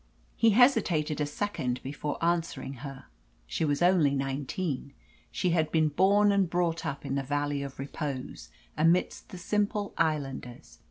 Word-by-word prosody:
He 230 - +4
hesitated 175 - +3
a 145 - 0
second 145 -7 -2
before 145 +2 -4
answering 165 -5 -1
her. 135 -2 -8 0.4
She 110 - -2
was 145 +1 +1
only 170 -6 +4
nineteen; 140 +1 -3 0.4
she 180 - 0
had 160 -2 +1
been 155 -1 +3
born 200 +6 +4
and 195 -3 +2
brought 170 -1 0
up 140 0 -5
in - - -2
the 140 - 0
Valley 145 +1 -1
of 140 -1 -7
Repose 140 -1 -5 0.3
amidst 165 +4 +1
the 185 - -8
simple 205 +2 -1
islanders. 140 -6 -2
155 Hz, 150 wpm, -29 LUFS, 140-180 Hz, 0.4 s, He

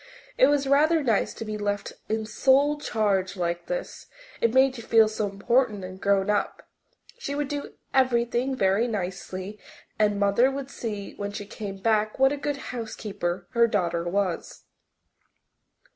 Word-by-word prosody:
It - - +6
was 285 -1 +2
rather 305 +3 +4
nice 225 -6 +1
to 225 - -6
be 215 0 -4
left 205 -1 -2 0.2
in 220 0 -1
sole 280 +6 +3
charge 200 -7 0
like 170 -1 -2
this - - -5 0.3
it 230 - +3
made 260 +1 +4
you 235 - -7
feel 225 -1 +5
so 215 -1 -2
important 210 +1 +1
and 185 +1 -8
grown 200 -1 +2
up. 210 -1 -1 0.5
She 280 - -4
would 290 -1 -1
do 290 0 -5 0.2
everything 250 0 +2
very 195 +1 +2
nicely 190 -1 -5 0.4
and 210 -1 +2
Mother 200 +6 +4
would 275 0 -5
see 210 -4 -5
when 200 0 -4
she 205 0 -6
came 200 -1 -7
back 215 +1 +1
what 270 +1 +4
a - - -3
good 290 0 -2 0.2
housekeeper 200 -6 -4
her 235 -1 +4
daughter 175 -6 0
was. 190 -2 -2
215 Hz, 160 wpm, -26 LUFS, 200-265 Hz, 0.5 s, It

